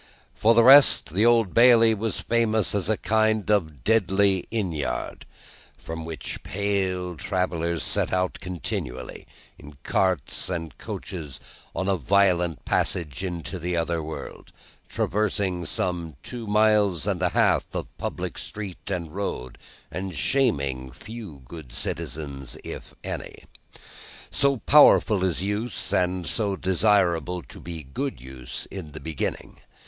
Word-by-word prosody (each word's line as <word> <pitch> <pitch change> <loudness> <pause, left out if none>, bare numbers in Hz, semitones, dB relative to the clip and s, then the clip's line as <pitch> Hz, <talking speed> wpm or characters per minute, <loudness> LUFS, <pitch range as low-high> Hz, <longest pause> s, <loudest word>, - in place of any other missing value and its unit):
For 115 +2 +4
the 115 - +6
rest, 135 - +7
the 105 +5 +4
Old 115 -5 +4
Bailey 115 -1 +7
was 110 -2 -2
famous 115 -2 +1
as 100 -1 -1
a 110 - +2
kind 110 0 +1
of 80 -11 0
deadly 100 - +3
inn 105 -6 -1
yard, 70 -6 -4 0.5
from 80 0 -6
which 80 -1 -6
pale 95 -3 -1
travellers 85 0 -1
set - - 0
out 90 0 0
continually, 80 -8 -5 0.3
in 75 -1 -13
carts 95 -6 +1
and 80 -4 -4
coaches, 75 -7 -6 0.4
on 95 - -1
a 95 -1 +2
violent 90 -2 +2
passage 80 -1 -1
into 90 0 -4
the 90 +1 -2
other 85 0 0
world: 80 0 -8 0.4
traversing 95 -4 0
some 85 -3 -2
two 120 -3 -7
miles 105 -5 +3
and - - -1
a - - +3
half - - +2
of - - -5
public - - -4
street 100 -2 -7
and 85 -5 -3
road, 65 -11 -4 0.3
and 90 0 -5
shaming 70 - 0
few 85 - -10
good 75 -3 -10
citizens, 70 0 -4
if - - -8
any. - - -6 0.9
So 140 -1 +2
powerful 115 -7 +6
is 90 -1 0
use, 105 +2 -3
and 90 0 +1
so 100 -1 0
desirable 90 -4 +2
to - - -13
be 85 -2 -7
good 135 - -4
use 65 -1 -8
in 85 -7 -7
the 75 - -7
beginning. 75 0 -4
90 Hz, 135 wpm, -25 LUFS, 80-105 Hz, 0.9 s, rest